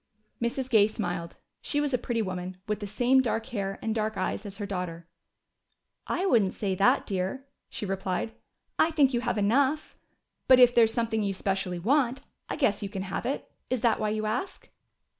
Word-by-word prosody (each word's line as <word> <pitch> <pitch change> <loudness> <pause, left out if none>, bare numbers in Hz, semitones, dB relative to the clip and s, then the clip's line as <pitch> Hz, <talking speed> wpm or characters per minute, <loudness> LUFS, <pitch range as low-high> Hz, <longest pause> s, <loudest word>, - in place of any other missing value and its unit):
Mrs. 240 +2 -1
Gay 220 -5 +5
smiled. 175 -6 -4 0.3
She 290 - -1
was 290 -2 0
a - - +4
pretty 230 -2 -1
woman, 185 -1 -5
with 210 -1 -1
the 205 - -5
same 245 +6 +3
dark 225 -2 -1
hair 195 -3 -2
and 220 - 0
dark 215 -1 -1
eyes 200 +2 -2
as 195 0 -8
her 205 - -4
daughter. 180 -4 -5 1.0
"I 370 - 0
wouldn't 220 - +3
say 200 -3 -1
that, 195 +2 +3
dear," 195 +8 -3 0.2
she - - -5
replied. 195 +2 -2 0.5
"I 320 - +5
think 290 -5 +3
you 240 - +1
have 240 -2 -1
enough. 270 +9 +1 0.5
But 255 -1 +7
if 245 -1 +7
there 235 -2 +6
is 220 - -2
something 225 -1 0
you 200 -2 -1
specially 190 -2 -2
want, 255 - +1 0.3
I - - -2
guess 265 -9 +1
you 200 - -3
can 195 -2 -4
have 195 +5 -3
it. 275 - -3 0.2
Is 255 -3 -1
that 230 -2 +3
why 215 - 0
you 215 0 -1
ask?" 245 - -3
215 Hz, 195 wpm, -28 LUFS, 195-250 Hz, 1.0 s, But